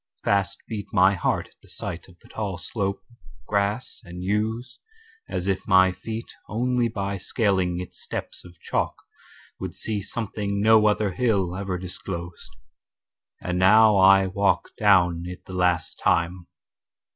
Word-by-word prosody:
Fast 100 -1 0
beat 105 -3 -5
My 95 0 +5
heart 90 - -1
at - - -31
the - - -20
sight 85 - -5
of 90 -2 -18
the - - -17
tall 100 -4 -4
slope 100 +1 -3
Or - - -20 0.3
grass 100 +3 -1
and 90 -2 -8
yews, 110 +5 -2 0.5
as 90 - -2
if 95 -1 -1
my 95 0 +6
feet 110 +5 -7 0.2
Only 120 +2 +1
by 100 -3 -3
scaling 95 -3 0
its 90 - -8
steps - - -6
of 90 -1 -15
chalk - - -1 0.6
Would - - -5
see 105 -2 -2
something 100 -1 -3
no 110 +1 +5
other 105 -1 +1
hill 95 -4 0
Ever 95 -1 -3
disclosed. 90 -1 -7 0.9
And 90 0 -1
now 105 +3 +6
I 95 0 +6
walk 100 +1 +1
Down 90 -5 +4
it 90 0 -9
the 95 - -9
last 90 -3 0
time. 85 +1 +1
100 Hz, 150 wpm, -25 LUFS, 90-105 Hz, 0.9 s, my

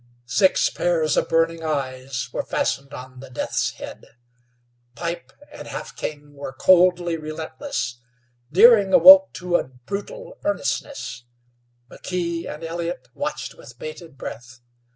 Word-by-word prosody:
Six 155 +11 +3
pairs 165 -3 +1
of - - +1
burning 165 0 +2
eyes 130 -4 -3
were - - -1
fastened 135 0 -2
on 130 -1 -10
the 135 0 -11
Deaths 125 - -1
head. - - -11 0.8
Pipe 170 +2 -5 0.2
and - - -10
Half - - -7
King 145 -1 -6
were 140 -2 -7
coldly 175 +1 +4
relentless; 155 - -5 0.5
Deering 200 +1 +6
awoke 285 0 +9
to 180 -1 0
a - - -3
brutal 205 - -8
earnestness; 285 - -3 0.6
McKee 170 +3 -4
and 150 +2 -9
Elliott 170 +1 -4
watched - - -4
with 120 - -14
bated 155 +1 -9
breath. 120 -1 -9
165 Hz, 125 wpm, -23 LUFS, 135-180 Hz, 0.8 s, awoke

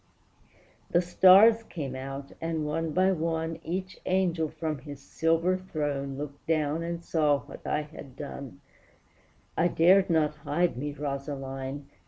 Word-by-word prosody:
The 175 - +4
stars 195 +6 +7
came 145 - -6
out; 135 +1 -6
and, 165 -2 -2
one 160 +2 -1
by 185 +4 +3
one, 165 -1 -2
Each 185 +2 -4
angel 175 -4 +1
from 155 -2 -4
his 145 +1 -9
silver 165 +5 +1
throne 145 -6 -3
Looked 145 0 -7
down 155 -1 +1
and 170 0 -4
saw 150 -5 +2
what - - -11
I 150 - 0
had 145 -3 -12
done; 140 -1 -8 0.9
I 175 - +3
dared 185 +3 +5
not 155 -2 +2
hide 165 +3 0
me, 145 +4 -3
Rosaline! 140 -1 -5
155 Hz, 140 wpm, -28 LUFS, 140-170 Hz, 0.9 s, stars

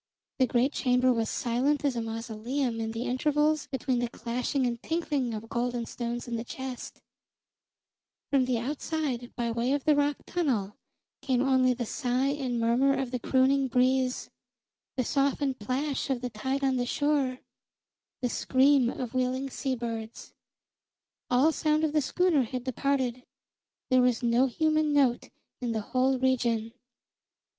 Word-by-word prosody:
The 260 - +4
great 245 +4 +1
chamber 250 0 +3
was 225 -2 -1
silent 260 +5 0
as 275 -3 +1
a 235 - -1
mausoleum 230 +2 -3
in 220 - -2
the 230 +1 -3
intervals 295 +4 +1
between 260 -1 -1
the 240 -1 -1
clashing 245 +4 -2
and 235 -1 -2
tinkling 295 -7 -1
of 215 +1 -7
gold 240 +1 -1
and 235 -1 -3
stones 240 0 -4
in 235 -1 -2
the 225 - -4
chest; 260 +1 -7 1.3
from 270 -2 +3
the 250 -1 0
outside, 265 -1 -3
by 235 -1 -1
way 235 +3 0
of 285 -2 -1
the 305 -1 +4
rock 290 0 +1
tunnel, 235 - -1 0.5
came 255 -2 +1
only 260 -2 +3
the 240 0 -3
sigh 250 +4 0
and 265 -4 -2
murmur 245 +4 +3
of 260 -2 -2
the 250 - -2
crooning 265 +2 +2
breeze, 255 0 +1 0.7
the 255 - +2
softened 275 0 0
plash 265 +7 -2
of 260 -3 -1
the 250 -1 -4
tide 265 +6 -2
on 265 -1 +2
the 245 0 -1
shore, 285 -3 +1 0.9
the 245 - +1
scream 265 0 +3
of 250 -1 -5
wheeling 255 +1 -1
seabirds. 235 -4 -4 1.0
All 260 +6 +4
sound 310 0 +1
of 310 -1 +1
the 305 - +3
schooner 345 +1 +2
had 250 +1 -3
departed; 260 -1 -1 0.7
there 255 0 +6
was 250 -1 +2
no 240 +3 +3
human 310 +3 +1
note 265 -4 +2 0.3
in 240 -2 -1
the 220 - -1
whole 260 +1 +3
region. 235 -3 0
255 Hz, 155 wpm, -28 LUFS, 240-275 Hz, 1.3 s, there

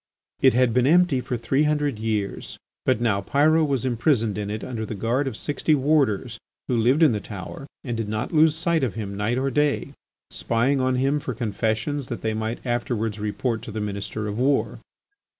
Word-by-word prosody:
It 130 -3 +5
had 125 -2 +3
been 125 +1 +3
empty 170 -4 +4
for 125 -1 -3
three 135 +5 0
hundred 150 -5 0
years, 110 -3 -3 0.3
but - - +3
now 110 -4 +1
Pyrot 155 +8 +3
was 135 -3 -1
imprisoned 120 -3 +1
in 105 -1 -3
it 105 +1 -4
under 115 -3 -4
the 110 - -5
guard 120 +7 0
of 120 -4 -4
sixty 150 +1 +1
warders, 130 -6 +1 0.3
who 125 - 0
lived 125 +8 +3
in 155 - +6
the 105 - -1
tower 100 +7 -8 0.2
and 120 -4 -3
did 115 -2 -3
not 110 +2 -3
lose 155 0 +5
sight 165 -2 0
of 125 - -1
him 100 -3 -5
night 105 +4 -1
or 135 +1 0
day, 145 -1 0 0.4
spying 130 +4 +1
on 130 0 +1
him 135 +3 +1
for 130 -4 -5
confessions 115 +5 -2
that 120 - -5
they 110 -1 0
might 110 +3 -4
afterwards 115 -3 -1
report 110 +2 -2
to - - -8
the 110 - -4
Minister 105 +1 -4
of 105 +2 -4
War. 135 +2 +1
120 Hz, 200 wpm, -24 LUFS, 110-140 Hz, 0.4 s, in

